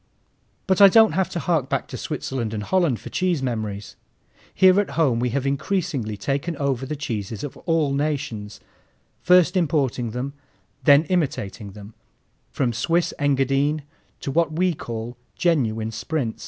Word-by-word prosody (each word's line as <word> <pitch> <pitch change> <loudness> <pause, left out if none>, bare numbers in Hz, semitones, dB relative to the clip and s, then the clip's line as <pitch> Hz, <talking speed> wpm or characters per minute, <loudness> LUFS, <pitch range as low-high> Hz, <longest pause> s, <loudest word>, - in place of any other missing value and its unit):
But 190 0 +2
I 200 - +11
don't 220 +3 +6
have 190 +4 0
to - - -5
hark 165 -6 0
back - - -1
to - - -7
Switzerland 115 -4 -4
and 105 - -3
Holland 170 - +1
for - - -10
cheese 180 -6 0
memories. 105 -5 -4 0.6
Here 190 0 +5
at 205 - -5
home 135 -8 +3
we 125 +1 0
have 135 +3 -2
increasingly 140 - -1
taken 140 +9 -2
over 135 -2 -1
the 150 - -3
cheeses 110 -7 -4
of 145 - -6
all 160 -4 +2
nations, 135 -8 -3 0.6
first 180 +1 +4
importing 140 -8 0
them, 125 +5 -4 0.5
then 145 +3 +6
imitating 130 - -2
them, 105 +1 -11 0.6
from 125 -4 -1
Swiss 165 +10 0
Engadine 140 +1 +1 0.4
to 135 - -3
what 165 +1 +2
we 180 +3 +1
call 115 -3 -6 0.2
Genuine 115 -10 0
Sprinz. 125 -1 -3
140 Hz, 155 wpm, -23 LUFS, 115-165 Hz, 0.6 s, I